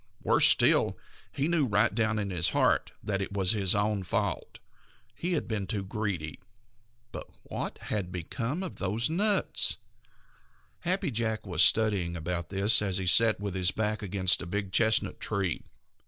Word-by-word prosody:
Worse -, -, +6 dB
still, -, -, +4 dB, 0.3 s
he 140 Hz, +2 st, -2 dB
knew 165 Hz, -5 st, +1 dB
right 105 Hz, +1 st, +2 dB
down 110 Hz, 0 st, 0 dB
in 100 Hz, -2 st, -3 dB
his 85 Hz, -3 st, +2 dB
heart -, -, +1 dB
that 100 Hz, -1 st, -2 dB
it 95 Hz, -, -5 dB
was 95 Hz, -2 st, +2 dB
his 100 Hz, -3 st, +2 dB
own 105 Hz, 0 st, 0 dB
fault. 95 Hz, -, -3 dB, 0.6 s
He 180 Hz, +1 st, -3 dB
had 160 Hz, -, -2 dB
been 105 Hz, -4 st, -3 dB
too 100 Hz, +1 st, -3 dB
greedy. 95 Hz, -6 st, -4 dB, 0.7 s
But -, -, -7 dB, 0.2 s
what -, -, -6 dB
had 95 Hz, -4 st, -4 dB
become 115 Hz, -, -4 dB
of 185 Hz, -, -7 dB
those 105 Hz, +9 st, 0 dB
nuts? 200 Hz, +3 st, +1 dB, 1.0 s
Happy 185 Hz, -2 st, -2 dB
Jack 110 Hz, -2 st, -2 dB
was 90 Hz, -4 st, -1 dB
studying 100 Hz, -6 st, +3 dB
about 85 Hz, +1 st, -4 dB
this 100 Hz, +3 st, +3 dB
as 95 Hz, -2 st, 0 dB
he 95 Hz, -, -3 dB
sat 110 Hz, +4 st, +5 dB
with 100 Hz, -2 st, -4 dB
his 95 Hz, -1 st, +1 dB
back 110 Hz, +2 st, -2 dB
against 95 Hz, -2 st, +2 dB
a -, -, -7 dB
big 100 Hz, +1 st, -4 dB
chestnut 110 Hz, +2 st, +1 dB
tree. 100 Hz, -6 st, -2 dB
105 Hz, 165 wpm, -28 LUFS, 95-115 Hz, 1.0 s, Worse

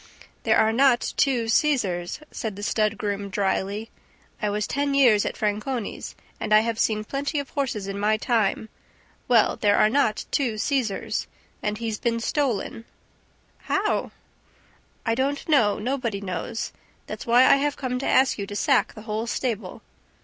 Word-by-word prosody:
"There -, -, +4 dB
are 220 Hz, 0 st, +3 dB
not 260 Hz, 0 st, +3 dB
two 250 Hz, -5 st, +2 dB
Cesars," 225 Hz, -, +1 dB
said 220 Hz, -4 st, -4 dB
the 205 Hz, -, -8 dB
stud 215 Hz, 0 st, +1 dB
groom 200 Hz, -1 st, -3 dB
dryly. 200 Hz, +2 st, -1 dB, 0.5 s
"I 210 Hz, -, +1 dB
was 210 Hz, 0 st, -1 dB
ten 280 Hz, 0 st, -1 dB
years 240 Hz, -7 st, +5 dB
at -, -, -5 dB
Franconi's 215 Hz, +2 st, -3 dB, 0.2 s
and -, -, -4 dB
I 215 Hz, 0 st, +7 dB
have 230 Hz, 0 st, -2 dB
seen 215 Hz, -1 st, +1 dB
plenty 280 Hz, +6 st, -3 dB
of 285 Hz, -1 st, -3 dB
horses 240 Hz, -8 st, -2 dB
in 200 Hz, 0 st, -4 dB
my 215 Hz, +1 st, +2 dB
time. 220 Hz, -1 st, 0 dB, 0.6 s
Well, 235 Hz, -4 st, +4 dB
there 205 Hz, -1 st, +3 dB
are 215 Hz, -, +4 dB
not 240 Hz, -5 st, +1 dB
two 245 Hz, -7 st, 0 dB
Cesars. 240 Hz, -4 st, -1 dB, 0.3 s
And 210 Hz, 0 st, -2 dB
he's 225 Hz, -1 st, -3 dB
been 230 Hz, -1 st, 0 dB
stolen." 230 Hz, -3 st, -1 dB, 0.8 s
"How?" 400 Hz, +2 st, 0 dB, 1.0 s
"I 225 Hz, -, +2 dB
don't 275 Hz, +4 st, -1 dB
know. 250 Hz, -10 st, +3 dB
Nobody 235 Hz, -3 st, -2 dB
knows. 185 Hz, +2 st, -4 dB, 0.3 s
That's -, -, -7 dB
why 240 Hz, +2 st, +6 dB
I 275 Hz, -, +6 dB
have 285 Hz, +1 st, -1 dB
come 250 Hz, -2 st, -2 dB
to 270 Hz, -, -3 dB
ask 260 Hz, -3 st, +3 dB
you 200 Hz, -, -3 dB
to 205 Hz, -, -7 dB
sack 265 Hz, +4 st, +2 dB
the 215 Hz, -, -10 dB
whole 220 Hz, +1 st, -3 dB
stable." 225 Hz, -6 st, -3 dB
225 Hz, 165 wpm, -25 LUFS, 210-265 Hz, 1.0 s, I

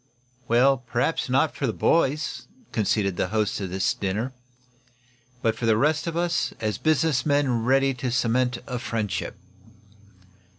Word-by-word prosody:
"Well, 130 Hz, +3 st, +4 dB
perhaps 125 Hz, +5 st, -1 dB
not 135 Hz, +5 st, +2 dB
for 140 Hz, -, -1 dB
the 110 Hz, -, -1 dB
boys," 150 Hz, +2 st, +1 dB, 0.2 s
conceded 100 Hz, -3 st, 0 dB
the -, -, 0 dB
host 105 Hz, -1 st, -1 dB
of 95 Hz, -, -3 dB
this 95 Hz, +1 st, 0 dB
dinner. 105 Hz, +7 st, -3 dB, 1.1 s
"But 115 Hz, -2 st, +2 dB
for 115 Hz, +1 st, -2 dB
the 110 Hz, -1 st, +4 dB
rest 155 Hz, +6 st, +1 dB
of 165 Hz, 0 st, -2 dB
us, 170 Hz, -1 st, 0 dB
as 110 Hz, -2 st, -2 dB
business 155 Hz, -4 st, +2 dB
men 140 Hz, -6 st, +1 dB
ready 135 Hz, +1 st, +3 dB
to 125 Hz, 0 st, -3 dB
cement 125 Hz, +1 st, +1 dB
a 125 Hz, -2 st, -4 dB
friendship." 115 Hz, -4 st, -3 dB
125 Hz, 145 wpm, -25 LUFS, 110-140 Hz, 1.1 s, Well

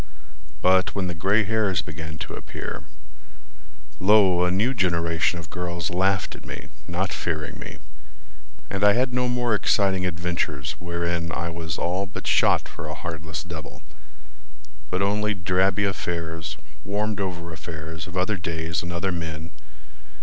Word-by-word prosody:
But 95 Hz, 0 st, +4 dB
when 100 Hz, -2 st, 0 dB
the 90 Hz, -, -1 dB
gray 100 Hz, +6 st, +3 dB
hairs 100 Hz, -5 st, +2 dB
began 80 Hz, 0 st, -6 dB
to -, -, -8 dB
appear— -, -, -6 dB, 1.1 s
Lo! 95 Hz, -3 st, +6 dB
a 90 Hz, -, +3 dB
new 105 Hz, +8 st, +2 dB
generation 85 Hz, -5 st, +2 dB
of 85 Hz, -1 st, -7 dB
girls 85 Hz, -2 st, -2 dB
Laughed 95 Hz, +1 st, +2 dB
at -, -, -11 dB
me, -, -, -7 dB, 0.2 s
not 90 Hz, +2 st, -1 dB
fearing 80 Hz, -3 st, -2 dB
me, -, -, -7 dB, 0.9 s
And 100 Hz, 0 st, -2 dB
I 105 Hz, 0 st, +8 dB
had 125 Hz, +2 st, +2 dB
no 125 Hz, 0 st, +2 dB
more 120 Hz, -2 st, +2 dB
exciting 100 Hz, -2 st, +3 dB
adventures 85 Hz, -5 st, -1 dB
Wherein 85 Hz, -1 st, -1 dB
I 85 Hz, +1 st, -2 dB
was 80 Hz, -1 st, -3 dB
all 95 Hz, +3 st, 0 dB
but 95 Hz, -, -7 dB
shot -, -, +4 dB
for -, -, -7 dB
a -, -, -4 dB
heartless 80 Hz, -1 st, -4 dB
devil, 85 Hz, -3 st, -8 dB, 1.1 s
But 90 Hz, +2 st, +1 dB
only 105 Hz, +1 st, +2 dB
drabby 95 Hz, +3 st, +2 dB
affairs, 85 Hz, -4 st, -2 dB, 0.3 s
warmed 105 Hz, +1 st, -1 dB
over 85 Hz, -3 st, -3 dB
affairs 80 Hz, 0 st, -6 dB
Of 90 Hz, +1 st, -6 dB
other 95 Hz, +3 st, +2 dB
days 80 Hz, -2 st, -1 dB
and 85 Hz, -, -5 dB
other 85 Hz, +2 st, 0 dB
men. 80 Hz, -2 st, -4 dB
90 Hz, 150 wpm, -25 LUFS, 85-100 Hz, 1.1 s, I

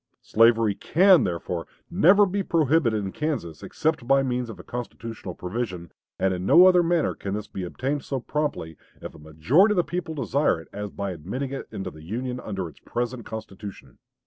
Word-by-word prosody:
Slavery 115 Hz, -1 st, +4 dB
can, 180 Hz, -, +4 dB
therefore, 85 Hz, -1 st, -3 dB, 0.2 s
never 195 Hz, +3 st, +6 dB
be 200 Hz, +1 st, -1 dB
prohibited 150 Hz, -, +2 dB
in 95 Hz, -, -4 dB
Kansas 120 Hz, -, -3 dB
except 155 Hz, -6 st, -2 dB
by 135 Hz, 0 st, +4 dB
means 125 Hz, -2 st, -2 dB
of 110 Hz, -, -9 dB
a -, -, -9 dB
constitutional 115 Hz, -5 st, -7 dB
provision 90 Hz, -4 st, -5 dB, 0.3 s
and 95 Hz, 0 st, +1 dB
in 90 Hz, 0 st, -4 dB
no 170 Hz, -, +7 dB
other 180 Hz, -1 st, +6 dB
manner 170 Hz, -2 st, +1 dB
can 100 Hz, 0 st, -5 dB
this 105 Hz, 0 st, -4 dB
be 95 Hz, -, -7 dB
obtained 135 Hz, +10 st, -3 dB
so 135 Hz, -, -3 dB
promptly, 135 Hz, -, -3 dB, 0.2 s
if -, -, -8 dB
a -, -, -14 dB
majority 90 Hz, -, +3 dB
of -, -, -4 dB
the 175 Hz, -, +4 dB
people 175 Hz, -2 st, -4 dB
desire 140 Hz, -, +1 dB
it, 80 Hz, -, -14 dB
as 105 Hz, 0 st, -5 dB
by 100 Hz, -1 st, -4 dB
admitting 100 Hz, -, -5 dB
it 135 Hz, -, -5 dB
into 95 Hz, -1 st, -5 dB
the 80 Hz, -, -13 dB
Union 125 Hz, +9 st, -4 dB
under 95 Hz, -6 st, -4 dB
its 80 Hz, -, -14 dB
present 120 Hz, 0 st, -4 dB
constitution." 105 Hz, -2 st, -9 dB
120 Hz, 190 wpm, -25 LUFS, 95-150 Hz, 0.3 s, no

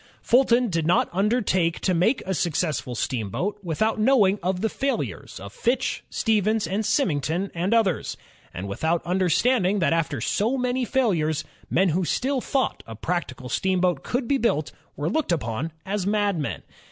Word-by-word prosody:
Fulton 245 Hz, -1 st, +4 dB
did 165 Hz, -2 st, 0 dB
not 175 Hz, -, +3 dB
undertake 190 Hz, -4 st, +1 dB
to 185 Hz, -, +1 dB
make 210 Hz, +9 st, +2 dB
a 190 Hz, -, -1 dB
successful 155 Hz, -7 st, -1 dB
steamboat 125 Hz, -, -2 dB
without 210 Hz, +6 st, 0 dB
knowing 215 Hz, -4 st, +4 dB
of 180 Hz, +1 st, -1 dB
the 220 Hz, -, +2 dB
failures 275 Hz, +5 st, -3 dB
of -, -, -9 dB
Fitch, 250 Hz, +2 st, -1 dB
Stevens, 215 Hz, -3 st, +1 dB, 0.2 s
Symington, 170 Hz, -, 0 dB
and 175 Hz, +4 st, -1 dB
others; 220 Hz, -8 st, +1 dB, 0.3 s
and 95 Hz, +3 st, -6 dB
without 160 Hz, +12 st, -1 dB
imderstanding 190 Hz, +4 st, +2 dB
that 170 Hz, -, +2 dB
after 155 Hz, -5 st, 0 dB
so 220 Hz, -, 0 dB
many 250 Hz, 0 st, 0 dB
failures, 180 Hz, -, +1 dB, 0.3 s
men 190 Hz, +2 st, +3 dB
who 180 Hz, +4 st, +1 dB
still 260 Hz, -, 0 dB
thought 270 Hz, +1 st, -1 dB
a 115 Hz, -, -7 dB
practical 130 Hz, -2 st, -3 dB
steamboat 180 Hz, +4 st, +1 dB
could 245 Hz, 0 st, -2 dB
be 275 Hz, +1 st, +2 dB
built 155 Hz, -11 st, 0 dB, 0.2 s
were 145 Hz, -, -2 dB
looked 310 Hz, -, 0 dB
upon 140 Hz, 0 st, -2 dB
as 195 Hz, -1 st, -2 dB
madmen. 200 Hz, -7 st, 0 dB
190 Hz, 155 wpm, -24 LUFS, 165-230 Hz, 0.3 s, Fulton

